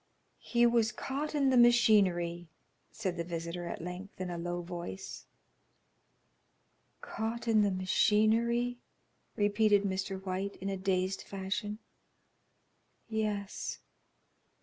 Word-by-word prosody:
"He 240 0 +2
was 235 -2 +3
caught 280 +7 -4
in 275 -2 +3
the 255 - +4
machinery," 195 -8 +4 0.4
said 185 -5 -3
the 170 - -1
visitor 170 +1 -5
at 165 - -5
length 180 +3 -7
in 185 -1 -3
a 175 - -4
low 175 +1 -3
voice. 170 - -7 1.7
"Caught 225 +2 -4
in 220 -2 +5
the 205 - +3
machinery," 225 +6 +2 0.6
repeated 205 -1 +3
Mr. 190 0 -2
White, 190 +2 -3
in 195 - -5
a 195 - -1
dazed 190 0 0
fashion, 200 +2 -4 1.3
"yes." 210 -2 -2
200 Hz, 110 wpm, -32 LUFS, 185-225 Hz, 1.7 s, in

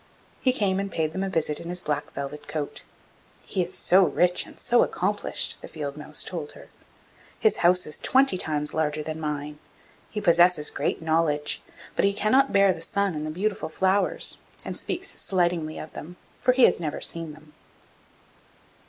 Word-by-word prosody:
He 255 - +3
came 195 -6 0
and 200 0 -3
paid 155 -1 -1
them 190 - -2
a 195 - -2
visit 160 -4 -1
in 170 - -8
his 180 0 -1
black 150 -3 -3
velvet 140 +2 -6
coat. 150 -2 -4 0.6
'He 185 - -1
is 175 - -6
so 190 +2 +5
rich 180 0 +1
and - - -15
so 240 0 +3
accomplished,' - - -1
the - - -8
field 145 -3 -6
mouse 150 0 -1
told 160 -5 -5
her. - - -14 0.7
'His 440 - +3
house 180 +1 +4
is 150 - +1
twenty 265 -5 +3
times 150 -4 0
larger 155 -1 -1
than 155 +1 -5
mine; 150 -1 -4 0.5
he 210 - -4
possesses 175 -4 +4
great - - -2
knowledge, 160 -2 +1 0.3
but - - +1
he 200 0 +3
cannot 235 +7 +2
bear 195 -1 +4
the 165 - -10
sun 200 +3 0
and 155 0 -4
the - - -3
beautiful 195 +5 -2
flowers, 190 +4 +3 0.3
and - - -5
speaks 380 +2 -4
slightingly 175 -4 0
of 155 - -8
them, 175 +4 -9 0.2
for 250 0 +3
he 255 0 +3
has - - +5
never 155 -3 -3
seen 165 -2 -2
them. 155 0 -18
170 Hz, 180 wpm, -25 LUFS, 150-195 Hz, 0.7 s, so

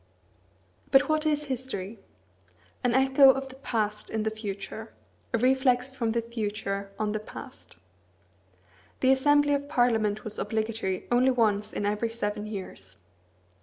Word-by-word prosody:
But 270 0 +5
what 310 0 +2
is 300 -1 +1
history? 235 -6 -5 0.8
An 245 -1 +2
echo 265 +1 +6
of 270 0 +2
the 260 - -12
past 215 -5 -2
in 220 -1 -2
the 220 - 0
future; 215 +1 -6 0.4
a - - +2
reflex 255 +1 +2
from 235 -4 -1
the 235 0 0
future 210 -3 -3
on 215 -1 -1
the 215 - -2
past. 215 - -11 1.3
The 260 - +5
assembly 290 +2 +4
of 285 0 -2
Parliament 225 -7 +2
was 215 - -5
obligatory 220 -4 -2
only 250 +2 +4
once 215 -5 +1
in 205 - -3
every 210 +3 0
seven 210 -2 -3
years. 95 - -8
230 Hz, 140 wpm, -27 LUFS, 210-265 Hz, 1.3 s, echo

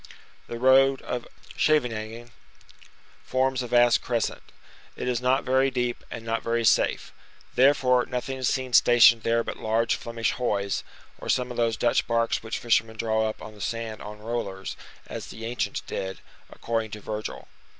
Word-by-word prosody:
The 120 - -5
road 135 +2 +4
of 125 -1 -4 0.3
Scheveningen 120 -5 0 0.9
forms 130 0 0
a 125 - -4
vast 120 0 +4
crescent; 120 -2 -2 0.5
it - - -5
is 125 -1 0
not 130 +2 +2
very 130 +1 +3
deep 125 -2 -2
and 115 - -7
not 115 0 -1
very 115 0 0
safe; - - +2 0.4
therefore, 125 -1 +4
nothing 130 +1 -4
is 130 - 0
seen 130 -2 -2
stationed 120 -1 +7
there 115 +1 +1
but - - -5
large 115 +1 +1
Flemish 115 -1 -2
hoys, 100 -5 -1 0.4
or - - -7
some 125 0 +1
of 125 - -7
those 115 -1 +1
Dutch 120 - +1
barks 115 0 +1
which 110 0 -4
fishermen 115 -2 +1
draw 110 -1 +1
up 110 - -8
on 110 - -9
the 105 - -13
sand 115 -1 -4
on 105 0 -8
rollers, 105 -3 -4 0.3
as - - -7
the 110 0 -8
ancients 120 +1 -2
did, 95 0 -5 0.3
according 115 -1 -3
to 105 - -7
Virgil. 105 +1 -6
115 Hz, 165 wpm, -26 LUFS, 110-125 Hz, 0.9 s, stationed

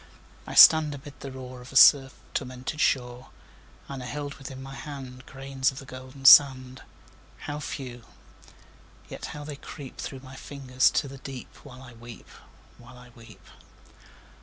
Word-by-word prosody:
I - - -7
stand 155 -2 +8
amid 145 +1 -13
the 135 - -8
roar 130 -1 -10
Of 125 - -13
a - - -13
surf 135 -1 +6 0.2
tormented 130 +4 -5
shore, 125 -1 -1 0.6
And 135 -2 -7
I 125 - -7
hold 145 +2 -5
within 135 -1 -9
my 135 0 -9
hand 135 -3 -9
Grains 135 0 -2
of 130 - -14
the 135 - -9
golden 130 +1 -12
sand 130 -2 +6 0.6
How 145 0 -5
few! 125 -5 -7 1.0
yet - - -8
how 145 - -8
they 145 -1 -8
creep 140 -2 -11
Through 135 -2 -7
my 130 0 -13
fingers 130 -2 0
to 145 - -1
the 135 0 -11
deep 135 -2 -9
While 130 -2 -14
I 125 -2 -13
weep 120 -1 -13 0.5
while 120 +1 -15
I 125 0 -15
weep! 115 -2 -17
130 Hz, 160 wpm, -26 LUFS, 125-140 Hz, 1.0 s, stand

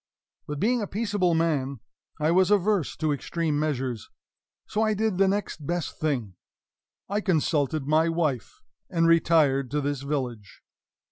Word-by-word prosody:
But, 150 -1 -4
being 240 +4 +2
a 205 - -3
peaceable 205 -5 0
man, 140 -6 0 0.4
I 155 +2 +2
was 185 +1 +4
averse 205 -5 +2
to 155 -2 0
extreme 155 +1 -2
measures. 130 -7 -2 0.6
So 215 - -2
I 215 -1 +2
did 215 -3 0
the 195 - +5
next 190 -7 -2
best 175 -2 -3
thing 130 -11 -1 0.9
consulted 155 -5 +1
my 155 +3 +3
wife, 155 -7 -2 0.3
and 165 -1 +1
retired 155 -5 +3
to 150 +3 -1
this 145 -1 -2
village. 125 -8 -4
155 Hz, 140 wpm, -26 LUFS, 140-185 Hz, 0.9 s, the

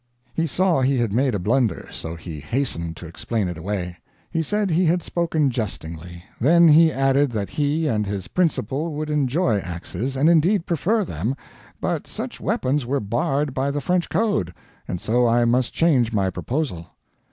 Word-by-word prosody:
He 165 0 0
saw 175 -1 +2
he 135 +1 +2
had 115 -4 0
made 130 0 +2
a - - +1
blunder, 115 +4 0
so 80 0 -6
he 80 -2 -8
hastened 85 - -2
to 85 - -9
explain 100 +5 -2
it 90 - -4
away. 90 0 -4 0.3
He 165 - 0
said 205 +3 0
he 175 +3 +3
had 175 +2 +2
spoken 160 -5 0
jestingly. 85 -6 -5 0.2
Then 170 +6 +6
he 160 +1 +7
added 135 +1 +2
that 100 -3 -3
he 150 +2 0
and 105 -6 0
his 100 -3 -4
principal 155 - -1
would 155 0 -3
enjoy 140 - +1
axes, 90 +8 -4
and 140 +4 +3
indeed 170 +3 +4
prefer 195 +6 +1
them, 110 - -2 0.4
but - - -2
such - - -6
weapons 135 +2 0
were 135 +4 -1
barred 135 +6 -1
by 135 +1 0
the 145 +1 -1
French 180 +4 0
code, 95 - 0 0.3
and 90 - -3
so 120 +5 +2
I 120 +1 +3
must 120 +1 +2
change 135 -9 +2
my 95 -4 +1
proposal. 120 - -3
130 Hz, 175 wpm, -23 LUFS, 100-160 Hz, 0.4 s, he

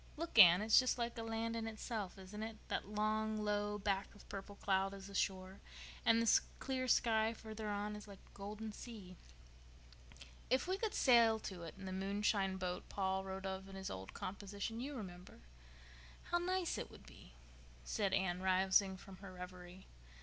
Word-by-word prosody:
"Look, 335 +2 0
Anne, 175 +3 +10
it's 220 0 +7
just 255 -1 +2
like 235 -1 -2
a 230 - -4
land 225 0 -2
in 225 -1 -2
itself, 215 -3 -4
isn't 195 +3 -8
it? 220 0 -5
That - - -2
long, 215 +1 0
low 210 0 0
back 200 -1 -1
of 205 - -15
purple 200 +1 -6
cloud 195 0 +1
is 195 -1 -9
the 200 - -10
shore, 190 -1 -1 0.4
and 230 0 +5
the 230 -1 +6 0.2
clear 260 -1 -2
sky 225 -2 +3
further 220 -1 -6
on 205 +1 -2
is 210 0 -9
like 200 -1 -10
a - - -22
golden 210 +2 -5
sea." 205 -6 -9 1.3
"If 260 +7 +2
we 380 +1 0
could 445 -1 -1
sail 235 -4 +6
to 185 -3 -6
it 165 -2 -7
in 195 - -8
the 190 - -4
moonshine 195 0 +1
boat 180 -1 -3
Paul 190 -1 0
wrote 190 0 -5
of 190 0 -4
in 195 - -9
his 190 0 -5
old 95 0 -7
composition—you 205 +7 -4
remember?—how - - -8
nice 365 0 0
it - - -5
would - - -14
be," - - -15 0.5
said 200 - 0
Anne, 180 -1 +1
rousing 190 +1 +3
from 190 0 -12
her 195 -1 -9
reverie. 180 0 -9
200 Hz, 180 wpm, -38 LUFS, 190-220 Hz, 1.3 s, Anne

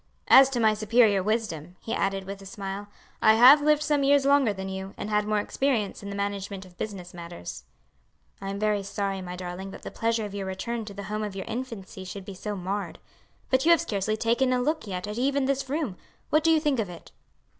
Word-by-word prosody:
As 270 0 +9
to 255 -3 -2
my 220 -2 +4
superior 215 -1 +3
wisdom," 185 -6 -2
he 225 - -5
added 195 0 0
with 195 +1 -7
a - - -11
smile, 200 -1 -6 0.3
"I 220 -1 +6
have 260 +6 +9
lived 300 0 +3
some 295 -1 +2
years 280 0 +4
longer 280 -5 +4
than 190 -1 -5
you, 190 0 -6
and 215 - -5
had 210 0 +1
more 215 0 +1
experience 220 0 -1
in 200 - -7
the 200 - -5
management 200 -1 -3
of 180 -1 -17
business 185 -3 -6
matters." 170 - -8 0.8
"I 195 - -4
am 200 - -3
very 210 0 +1
sorry, 195 -1 -3
my 180 -1 -6
darling, 180 +1 -6
that - - -11
the - - -6
pleasure 230 -1 0
of 205 - -7
your 200 -1 -4
return 225 +4 -3
to 205 - -8
the 200 - -6
home 210 +2 -3
of 205 -2 -5
your 190 - -5
infancy 225 -5 -6
should 185 +1 -8
be 200 - -7
so 205 +2 -5
marred. 195 +2 -4 0.5
But 260 0 +3
you 335 - +3
have 335 -1 +6
scarcely 215 - -1
taken 240 +4 +2
a 250 - +2
look 305 0 -1
yet 185 -1 -4
at 210 +3 -4
even 275 +1 +1
this 270 0 -1
room. 280 - -2 0.3
What 305 +1 +4
do 325 - +4
you 320 -1 +5
think 295 -5 +1
of 205 -4 -1
it?" 175 -1 -11
210 Hz, 230 wpm, -27 LUFS, 195-250 Hz, 0.8 s, As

